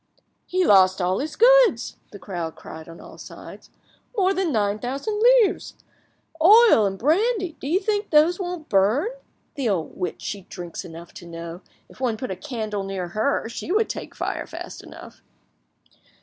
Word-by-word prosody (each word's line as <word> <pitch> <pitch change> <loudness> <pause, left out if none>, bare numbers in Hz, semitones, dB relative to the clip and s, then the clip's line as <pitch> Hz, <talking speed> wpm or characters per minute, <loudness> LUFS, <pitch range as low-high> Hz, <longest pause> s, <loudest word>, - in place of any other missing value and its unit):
"He 370 0 +1
lost 190 -1 +5
all 185 +1 0
his 305 +2 -4
goods!" 485 - +4
the 205 - -9
crowd 175 -5 -5
cried 160 +1 -11
on 165 - -11
all - - -13
sides. - - -12 0.5
"More 385 -1 +3
than 375 -4 -1
nine 210 -3 0
thousand 280 - -3
livres! 485 -3 +3 0.7
Oil 410 - +7
and 195 0 -4
brandy, 375 - +1
do - - -5
you 345 +6 +2
think 415 -1 -1
those 320 +5 +4
won't 355 -4 -5
burn? 215 - +2 0.4
The 265 -5 -1
old 175 -6 -2
witch, 180 -2 -4
she 200 - -4
drinks 175 -2 -8
enough 170 0 -11
to 175 - -11
know! 170 +1 -8 0.3
If - - -17
one 235 -4 0
put 255 -2 -5
a - - -3
candle 215 -3 -4
near 190 -2 -4
her 220 +7 -1
she 235 +8 -6
would 435 +3 +2
take - - -6
fire, - - -4
fast - - -8
enough!" - - -13
245 Hz, 170 wpm, -23 LUFS, -, 0.7 s, Oil